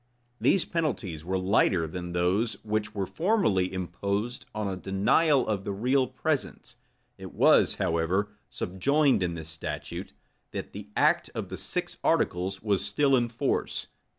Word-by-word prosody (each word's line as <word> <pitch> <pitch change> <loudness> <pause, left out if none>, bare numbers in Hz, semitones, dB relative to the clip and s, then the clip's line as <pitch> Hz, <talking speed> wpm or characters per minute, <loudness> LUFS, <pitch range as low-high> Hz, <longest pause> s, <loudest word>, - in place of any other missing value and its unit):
These 190 - +3
penalties 115 - -2
were 95 +3 -1
lighter 95 -2 +2
than 90 +2 -6
those 95 +6 +1
which 110 0 -2
were 100 -2 -1
formerly 160 - +1
imposed 100 +5 -3
on 105 -1 -1
a 95 - -2
denial 120 - +2
of 100 -3 -1
the 100 - -3
real 130 +6 +2
presence: - - -3 0.4
it - - -9
was, - - +5
however, 85 +5 0 0.2
subjoined 140 +9 +1
in 85 -2 -1
this 80 -1 -7
statute, 80 0 -6 0.4
that - - -5
the 105 +1 -9
act - - +3
of - - -4
the - - -5
six - - -3
articles 95 +2 +1
was 100 -3 +1
still 135 +7 +3
in 120 -2 +1
force. 115 - -1
100 Hz, 150 wpm, -28 LUFS, 90-120 Hz, 0.4 s, was